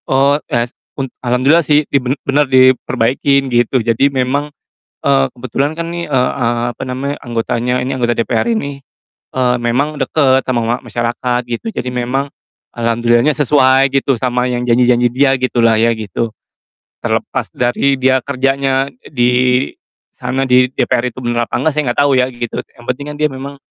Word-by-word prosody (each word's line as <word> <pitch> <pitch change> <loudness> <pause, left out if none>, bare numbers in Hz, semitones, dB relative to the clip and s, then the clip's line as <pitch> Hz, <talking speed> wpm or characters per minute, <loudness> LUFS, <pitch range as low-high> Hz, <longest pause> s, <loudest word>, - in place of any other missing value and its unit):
Eee, 135 +2 +3
yas 120 +1 -1 0.2
un 135 - -1 0.2
alhamdulillah 130 +6 +3
sih 150 0 +3
di - - +2
ben 130 +3 -2
bener 145 +2 +3
diperbaikin 130 +1 +3
gitu 120 +2 +2
jadi 120 +4 +3
memang, 135 +2 -1 0.5
eee, 135 -1 +3
kebetulan 130 +4 -2
kan 165 +1 -5
nih, 170 0 -4
eee 130 -3 +1
eee, 120 -1 0
apa - - -7
namanya 135 +3 -3
anggotanya 120 +1 -1
ini 130 - -3
anggota 120 -1 +1
DPR 115 - 0
ini, 140 -11 -3 0.6
eee, 125 -1 +1
memang 135 +6 0
deket 135 -1 +2
sama 125 -2 0
ma 115 +2 0
masyarakat 120 +1 -1
gitu 120 - -4
jadi 125 - -3
memang, 125 +3 -2 0.5
alhamdulillahnya 120 +4 +2
sesuai 135 -2 +4
gitu 135 0 +2
sama 125 0 0
yang 125 0 -2
janji-janji 120 0 +3
dia 135 +1 +3
gitu 130 -1 0
lah 115 -1 +4
ya 115 +1 +3
gitu, 110 +2 -3 0.7
terlepas - - -2
dari 125 +3 +1
dia 130 0 +3
kerjanya 135 0 0 0.2
di, 125 0 +2 0.4
sana 135 +1 -2
di 125 0 +4
DPR 125 -1 0
itu - - -13
bener 120 0 0
apa - - -1
nggak 160 - +1
saya 150 -4 0
nggak - - -19
tau 145 0 +3
ya 130 0 +2
gitu 120 -2 -4 0.2
yang 120 - -14
penting 135 +3 -3
kan - - -9
dia 155 - +4
memang, 135 +2 -7
130 Hz, 170 wpm, -15 LUFS, 120-140 Hz, 0.7 s, sesuai